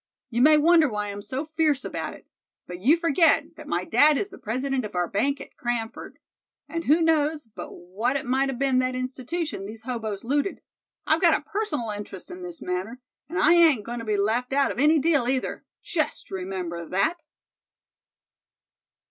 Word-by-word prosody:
You 235 Hz, +1 st, +1 dB
may 305 Hz, +3 st, +7 dB
wonder 320 Hz, 0 st, +5 dB
why 210 Hz, -2 st, -3 dB
I'm 200 Hz, 0 st, -7 dB
so 265 Hz, +7 st, -4 dB
fierce 310 Hz, -3 st, 0 dB
about -, -, -4 dB
it; -, -, -17 dB, 0.4 s
but 180 Hz, 0 st, -8 dB
you 275 Hz, -, +4 dB
forget 330 Hz, -1 st, +3 dB
that -, -, -11 dB
my -, -, -1 dB
dad 300 Hz, 0 st, +5 dB
is 410 Hz, -, -3 dB
the -, -, -12 dB
president 260 Hz, +4 st, -2 dB
of 210 Hz, -3 st, -7 dB
our 175 Hz, -1 st, +1 dB
bank 275 Hz, +10 st, 0 dB
at -, -, -11 dB
Cranford; 240 Hz, -2 st, -4 dB, 0.5 s
and 335 Hz, 0 st, -4 dB
who 315 Hz, +4 st, +4 dB
knows 310 Hz, -2 st, +2 dB
but 225 Hz, -, -9 dB
what 210 Hz, +9 st, -3 dB
it 280 Hz, -, -2 dB
might 265 Hz, +2 st, +1 dB
a -, -, -2 dB
been 260 Hz, 0 st, +1 dB
that 255 Hz, 0 st, 0 dB
institution 255 Hz, -, -4 dB
these 220 Hz, +1 st, -10 dB
hoboes 220 Hz, -5 st, -4 dB
looted. 285 Hz, +9 st, -1 dB, 0.4 s
I've -, -, +2 dB
got -, -, +5 dB
a -, -, -21 dB
personal 310 Hz, -, -2 dB
interest 205 Hz, -, -8 dB
in 360 Hz, +1 st, -8 dB
this 350 Hz, -5 st, -8 dB
matter, 185 Hz, +7 st, -3 dB, 0.3 s
and 350 Hz, -, -4 dB
I 320 Hz, 0 st, +5 dB
ain't 320 Hz, -11 st, +5 dB
going 240 Hz, 0 st, -4 dB
to -, -, -6 dB
be 210 Hz, -1 st, 0 dB
left 230 Hz, +6 st, 0 dB
out 280 Hz, 0 st, +3 dB
of -, -, -6 dB
any 305 Hz, +3 st, +5 dB
deal 295 Hz, -4 st, +2 dB
either, 260 Hz, 0 st, -2 dB, 0.2 s
just 310 Hz, -4 st, -2 dB
remember 185 Hz, -3 st, -4 dB
that!" 200 Hz, -, 0 dB
260 Hz, 190 wpm, -25 LUFS, 215-310 Hz, 0.5 s, may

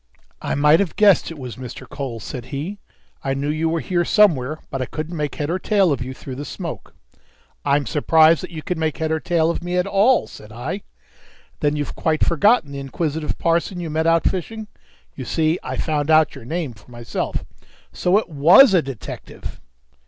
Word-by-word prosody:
"I -, -, -2 dB
might 150 Hz, +3 st, +5 dB
have 195 Hz, -5 st, -1 dB
guessed 205 Hz, -4 st, +4 dB
it 165 Hz, -, -8 dB
was 125 Hz, -3 st, -7 dB
Mr. 130 Hz, 0 st, -8 dB
Cole," 130 Hz, -5 st, -5 dB
said 120 Hz, +2 st, -7 dB
he. 150 Hz, +10 st, -5 dB, 0.4 s
"I 135 Hz, 0 st, -1 dB
knew 140 Hz, +2 st, -2 dB
you 155 Hz, +2 st, 0 dB
were 165 Hz, 0 st, -1 dB
here 175 Hz, +5 st, 0 dB
somewhere, 155 Hz, -, +3 dB
but 135 Hz, -, -3 dB
I 130 Hz, -, -2 dB
couldn't 160 Hz, +2 st, -5 dB
make 150 Hz, -3 st, -3 dB
head 145 Hz, +2 st, -2 dB
or 185 Hz, -, -1 dB
tail 195 Hz, -3 st, +2 dB
of 140 Hz, -, -1 dB
you 125 Hz, +1 st, -4 dB
through 130 Hz, 0 st, -8 dB
the 145 Hz, -, -5 dB
smoke." 170 Hz, +2 st, -7 dB, 0.7 s
"I'm 145 Hz, 0 st, +2 dB
surprised 160 Hz, +5 st, +4 dB
that 185 Hz, -, -7 dB
you 160 Hz, -3 st, -8 dB
can 180 Hz, -3 st, -3 dB
make 160 Hz, -1 st, -1 dB
head 160 Hz, 0 st, -1 dB
or 160 Hz, -, +1 dB
tail 165 Hz, -1 st, +1 dB
of 170 Hz, -, -5 dB
me 175 Hz, +1 st, -2 dB
at 180 Hz, -, +2 dB
all," 205 Hz, +6 st, +3 dB
said 105 Hz, 0 st, -13 dB
I. 120 Hz, -, -5 dB, 0.8 s
"Then 150 Hz, -1 st, +1 dB
you've 145 Hz, -1 st, -3 dB
quite 155 Hz, -1 st, +1 dB
forgotten 170 Hz, -1 st, +3 dB
the 140 Hz, -, -5 dB
inquisitive 150 Hz, +3 st, -3 dB
parson 170 Hz, +2 st, 0 dB
you 165 Hz, -3 st, -4 dB
met 160 Hz, +1 st, 0 dB
out 165 Hz, 0 st, +3 dB
fishing? 215 Hz, +4 st, -4 dB, 0.5 s
You 130 Hz, -, -6 dB
see 160 Hz, +7 st, 0 dB
I -, -, -5 dB
found 150 Hz, -2 st, -1 dB
out 155 Hz, -1 st, +5 dB
your 135 Hz, -4 st, -11 dB
name 155 Hz, -1 st, -3 dB
for 105 Hz, +2 st, -20 dB
myself!" 120 Hz, -1 st, -4 dB, 0.5 s
"So 180 Hz, +3 st, +2 dB
it 220 Hz, -, 0 dB
was 170 Hz, -, +7 dB
a 180 Hz, -, +5 dB
detective!" 135 Hz, -6 st, -8 dB
155 Hz, 205 wpm, -21 LUFS, 140-175 Hz, 0.8 s, was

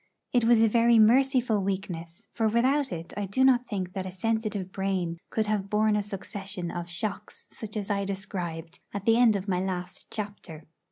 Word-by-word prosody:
It 245 Hz, -2 st, +3 dB
was 230 Hz, -1 st, +5 dB
a 225 Hz, -, +6 dB
very 235 Hz, +1 st, +4 dB
merciful 245 Hz, 0 st, +4 dB
weakness, 190 Hz, 0 st, -4 dB
for 225 Hz, -1 st, +1 dB
without 260 Hz, +5 st, +2 dB
it 165 Hz, 0 st, -6 dB
I 205 Hz, 0 st, -2 dB
do 260 Hz, +7 st, +2 dB
not 250 Hz, -2 st, +4 dB
think 185 Hz, -3 st, -3 dB
that 190 Hz, -1 st, -3 dB
a -, -, -6 dB
sensitive 210 Hz, -1 st, -2 dB
brain 185 Hz, -4 st, -2 dB
could 220 Hz, -, 0 dB
have 210 Hz, -2 st, -1 dB
borne 215 Hz, 0 st, +3 dB
a 210 Hz, -, +2 dB
succession 195 Hz, -2 st, -5 dB
of 175 Hz, 0 st, -5 dB
shocks 200 Hz, +3 st, -5 dB
such 215 Hz, -1 st, -7 dB
as 205 Hz, -1 st, -3 dB
I 200 Hz, -1 st, 0 dB
described 175 Hz, -4 st, -5 dB, 0.2 s
at 200 Hz, 0 st, -4 dB
the 225 Hz, 0 st, +5 dB
end 235 Hz, -3 st, +5 dB
of 200 Hz, 0 st, -3 dB
my 180 Hz, -2 st, +1 dB
last 180 Hz, -1 st, -4 dB
chapter. 200 Hz, -7 st, -6 dB
200 Hz, 190 wpm, -27 LUFS, 185-225 Hz, 0.2 s, a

